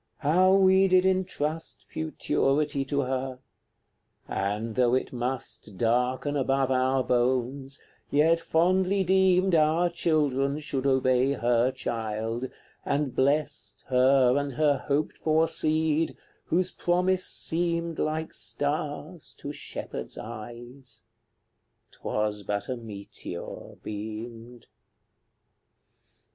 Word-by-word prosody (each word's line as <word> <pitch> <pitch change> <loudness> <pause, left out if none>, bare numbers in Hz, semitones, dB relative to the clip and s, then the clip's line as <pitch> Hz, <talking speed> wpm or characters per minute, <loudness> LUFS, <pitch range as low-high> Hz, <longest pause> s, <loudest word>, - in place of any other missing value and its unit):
How 185 +6 +4
we 190 0 +5
did 185 0 +4
entrust 165 -4 -2
Futurity 145 -2 0
to 140 +1 0
her! 130 0 -3 0.9
and, 105 +3 -2
though 125 +1 +3
it 130 - -2
must 120 -5 -5
Darken 125 +6 +1
above 135 -1 +1
our 130 0 +2
bones, 130 +3 0 0.3
yet 160 +3 +4
fondly 185 +4 +2
deemed 190 0 +3
Our 165 +2 +3
children 145 -5 +1
should 140 -3 -2
obey 130 0 +3
her 120 0 +2
child, 115 -1 -3 0.3
and 140 -2 -1
blessed 130 -7 -1
Her 130 0 +4
and 140 -1 -3
her 145 0 +2
hoped 145 +1 0
for 160 +1 +2
seed, 155 0 0 0.3
whose 180 +2 0
promise 180 +1 +1
seemed 170 0 -1
Like 155 +1 -2
star 145 - -3 0.2
to 145 - -6
shepherd's - - -7
eyes; 120 +2 -10 0.9
'twas 105 -1 -2
but 100 +3 -3
a 130 - -1
meteor 105 -4 -8
beamed. 115 +3 -7
135 Hz, 100 wpm, -27 LUFS, 120-160 Hz, 0.9 s, we